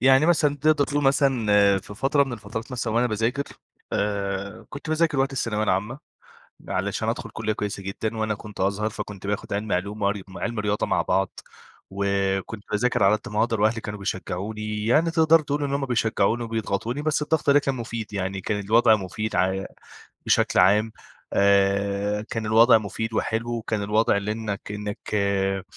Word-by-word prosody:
يعني 135 +4 +5
مثلًا 150 -4 +3
تقدَر 150 0 +3
تقول 145 0 -1
مثلًا 110 -8 +3
في 100 +2 -11
فترة 140 +5 +2
من 135 - -6
الفترات 110 +2 -6
مثلًا 120 -2 -2
وأنا 120 +1 +3
باذاكر، 115 +5 -1 0.5
آآ، 100 +1 -2
كنت 145 +2 -8
باذاكر 155 -2 +1
وقت 135 +1 +1
الثانوية 110 -5 -1
العامة، 105 +7 -1 0.7
علشان - - -2
أدخل - - -3
كُلِّية 110 - -2
كويسة 105 -1 -4
جدًا، 110 +3 -4
وأنا 110 -1 0
كنت 105 0 -10
أزهر 100 +3 0
فكنت 100 -1 -7
باخد 105 0 -3
علمي 100 -1 -1
علوم 100 +4 -3
وعر 100 0 0
وعلمي 115 0 -3
رياضة 105 0 0
مع - - +1
بعض، 95 -1 -1 0.5
وكنت 100 +1 -1
باذاكر 115 +4 +1
على 100 +2 +5
قدّ 105 - -10
ما 105 - +1
أقدَر 115 -2 +1
وأهلي 110 +2 +2
كانوا 105 -1 -6
بيشجعوني، 105 +3 -4
يعني 155 +8 +3
تقدَر 165 0 +5
تقول 145 -1 -2
إن 140 0 -1
هُم 140 - 0
بيشجعوني 115 -1 +1
وبيضغطوني، 115 +3 -2
بس 155 0 0
الضغط 150 -1 +1
ده 140 - +7
كان 140 -2 -1
مفيد 115 -3 -5
يعني، 95 -1 -3
كان 105 +2 -2
الوضع 110 +2 +4
مفيد 105 +2 -4
ع 95 +1 +1 0.6
بشكل - - +3
عام، 105 +4 +4 0.4
آآ، 100 +1 +2
كان 115 -3 -3
الوضع 115 +2 +6
مفيد 110 +2 -4
وحلو، 115 +2 -1
وكان 110 -2 -2
الوضع 105 +1 +2
لإنك 105 0 -3
إنك 105 0 -5 0.2
آآ، 95 -1 0
110 Hz, 170 wpm, -24 LUFS, 100-120 Hz, 0.7 s, ده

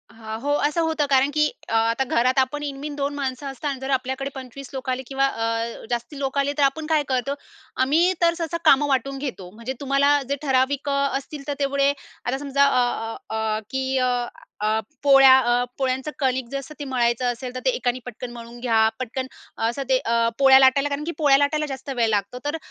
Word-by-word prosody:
हां, 220 -1 -7
हो. 285 +2 -1 0.2
असं 300 +3 -1
होतं. 320 -2 +1
कारण 270 0 +4
की 300 0 +3 0.2
अ, - - -3
आता 230 +3 +2
घरात 255 +1 +1
आपण 280 +3 0
इनमीन 285 +1 -5
दोन 285 0 -2
माणसं 275 0 -3
असतात 275 +2 -4
आणि 270 - -6
जर 265 +1 -5
आपल्याकडे 265 +1 -1
25 265 0 -9
लोक 265 -1 -5
आले 255 +1 -1
किंवा 270 0 +1
अ, 230 -1 -3
जास्ती 240 +4 -4
लोक 270 0 -2
आले, 280 +1 +1
तर 290 - +3
आपण 280 +3 +1
काय 310 -2 +2
करतो? 260 +1 0 0.5
आम्ही 325 +8 +3
तर 335 0 +4
सहसा 335 -1 -2
कामं 290 -1 +6
वाटून 275 0 0
घेतो. 225 -10 -6
म्हणजे 230 +4 -5
तुम्हाला 280 +1 +3
जे 280 - +1
ठराविक 275 0 +1
अ, - - +1 0.3
असतील 275 +1 -9
तर 290 - -1
तेवढे 280 0 +2 0.3
आता 255 +2 -1
समजा 280 0 +2
अ, 280 -2 +3 0.5
अ, - - -2
अ, 220 -1 -1
की 265 0 -1
अ, 255 -1 +2 0.5
अ, 215 +1 +1 0.2
पोळ्या 270 -2 +8
अ, 240 -1 +2
पोळ्यांचं 265 +2 -1
कणिक 260 -2 0
जसं 275 +2 -5
ते 290 - -4
मळायचं 245 -2 0
असेल, 245 +1 -7
तर - - -2
ते - - +4
एकाने 250 - -1
पटकन 245 0 -7
मळून 235 0 -10
घ्या. 225 -3 +3
पटकन 255 +1 -4 0.4
असं 240 +4 -2
ते 260 - +5
अ, 230 0 +2
पोळ्या 270 -1 +8
लाटायला, 270 +2 +4
कारण 285 +1 -3
की 335 - -3
पोळ्या 285 -3 +5
लाटायला 300 +2 +1
जास्त 270 -1 -7
वेळ 235 -2 +2
लागतो. 205 +2 -1
तर 295 +2 -1
265 Hz, 210 wpm, -23 LUFS, 245-285 Hz, 0.5 s, पोळ्या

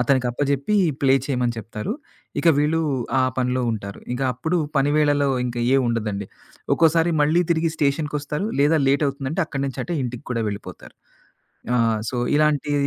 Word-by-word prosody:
అతనికి 125 +1 +2
అప్పజెప్పి 140 - 0 0.3
ప్లే 135 -1 +4
చేయమని 125 -4 -1
చెప్తారు. 110 - -5 0.5
ఇక 170 - +3
వీళ్ళు 155 +3 +2 0.4
ఆ - - +3 0.2
పనిలో 125 0 0
ఉంటారు. 100 -3 -5
ఇక 125 - -5
అప్పుడు 160 +8 -2 0.2
పనివేళలో 145 0 +3 0.2
ఇంక 120 -1 -5 0.2
ఏమి 135 - +4
ఉండదండి. 105 -4 -2 0.5
ఒక్కోసారి 165 +1 +3
మళ్ళీ 155 +4 +3
తిరిగి 165 0 +2
స్టేషన్‌కొస్తారు. 150 +3 -1
లేదా 155 +2 +4
లేట్ 140 +2 +3
అవుతుందంటే 140 +6 -2
అక్కడి 140 -3 -3
నుంచి 135 - -5
అటే 175 - -3
ఇంటికి 125 -1 -5
కూడా 115 -2 -1
వెళ్ళిపోతారు. 100 0 -8 0.8
ఆ! - - +3 0.3
సో 125 - -3 0.2
ఇలాంటి 150 -1 +2
140 Hz, 150 wpm, -22 LUFS, 125-150 Hz, 0.8 s, ప్లే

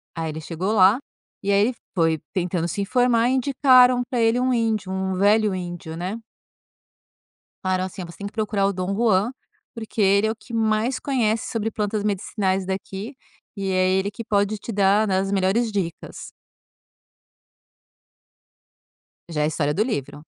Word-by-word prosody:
Aí 165 -1 -3
ele 155 +1 -6
chegou 180 +7 -3
lá, 195 +2 +6 0.5
e 200 - 0
aí 200 - +4
ele 255 - -1 0.2
foi 165 -2 +2
tentando 175 -2 -1
se 200 - -3
informar 245 +2 +2
e - - +1
indicaram 255 -2 +5
pra 250 -3 -1
ele 225 +2 +3
um 255 0 +1
índio, 220 -5 0
um 190 0 -2
velho 205 +1 +3
índio, 175 -2 -6
né. 185 +6 -4 1.5
Falaram 185 0 0
assim: 190 0 -7
"Você 170 - -12
tem 200 - -4
que - - -11
procurar 210 -2 0
o 200 - -1
Don 185 +2 -2
Juan, 220 0 +2 0.4
porque 220 -1 -4
ele 200 +2 +4
é - - 0
o - - -5
que 235 +1 -14
mais 220 +3 +1
conhece 230 -5 0
sobre 225 -1 -2
plantas 210 0 -2
medicinais 195 -2 -1
daqui 195 +6 -5 0.4
e 195 -1 -3
é 185 0 +2
ele 190 +2 +1
que 230 - -7
pode 205 0 0
te 230 - -7
dar, 205 +1 +3
né, 190 -1 +1
as 195 +1 -1
melhores 200 +4 +1
dicas". 180 -5 -5 3.0
Já 150 -2 -2
é - - +2
a - - +2
história 150 -1 -1
do 215 - +2
livro. 150 - -4
200 Hz, 170 wpm, -23 LUFS, 185-225 Hz, 3.0 s, lá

